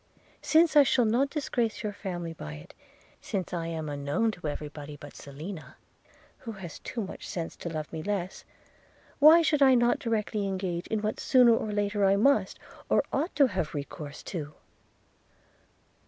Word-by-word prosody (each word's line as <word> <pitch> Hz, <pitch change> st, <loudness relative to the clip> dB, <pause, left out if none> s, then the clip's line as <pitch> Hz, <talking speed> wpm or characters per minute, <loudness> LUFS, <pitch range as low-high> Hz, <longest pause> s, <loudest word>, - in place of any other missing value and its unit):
Since 320 Hz, 0 st, +4 dB
I 295 Hz, -, +9 dB
shall 255 Hz, -3 st, +3 dB
not 245 Hz, +6 st, +2 dB
disgrace 245 Hz, -7 st, -2 dB
your 210 Hz, -1 st, -3 dB
family 175 Hz, -4 st, -5 dB
by 75 Hz, -, -8 dB
it; 75 Hz, +1 st, -12 dB, 0.5 s
since 190 Hz, -2 st, -4 dB
I 165 Hz, -1 st, -2 dB
am 160 Hz, -2 st, -4 dB
unknown 145 Hz, +10 st, 0 dB
to 175 Hz, -6 st, -7 dB
everybody 150 Hz, 0 st, -6 dB
but 145 Hz, 0 st, -12 dB
Selina, 155 Hz, +5 st, -9 dB, 0.6 s
who 230 Hz, -, -7 dB
has 190 Hz, -5 st, -9 dB
too 235 Hz, -, -5 dB
much 190 Hz, -, -8 dB
sense 170 Hz, -5 st, -4 dB
to 170 Hz, -, -5 dB
love 155 Hz, -1 st, -5 dB
me 160 Hz, -, -4 dB
less, 195 Hz, -1 st, -3 dB, 0.8 s
why 315 Hz, +3 st, +8 dB
should 300 Hz, -2 st, +2 dB
I 265 Hz, -2 st, +7 dB
not 240 Hz, 0 st, +3 dB
directly 215 Hz, -3 st, -1 dB
engage 185 Hz, -2 st, -3 dB
in 220 Hz, -1 st, -2 dB
what 215 Hz, -, -2 dB
sooner 250 Hz, -5 st, +5 dB
or 215 Hz, -, -2 dB
later 205 Hz, 0 st, 0 dB
I 195 Hz, 0 st, +5 dB
must, 275 Hz, +8 st, +2 dB, 0.3 s
I -, -, +4 dB
ought 315 Hz, +7 st, -1 dB
to 285 Hz, -, +6 dB
have 185 Hz, -8 st, -3 dB
recourse 145 Hz, 0 st, -7 dB
to?' 155 Hz, -5 st, -6 dB
195 Hz, 170 wpm, -28 LUFS, 160-235 Hz, 0.8 s, I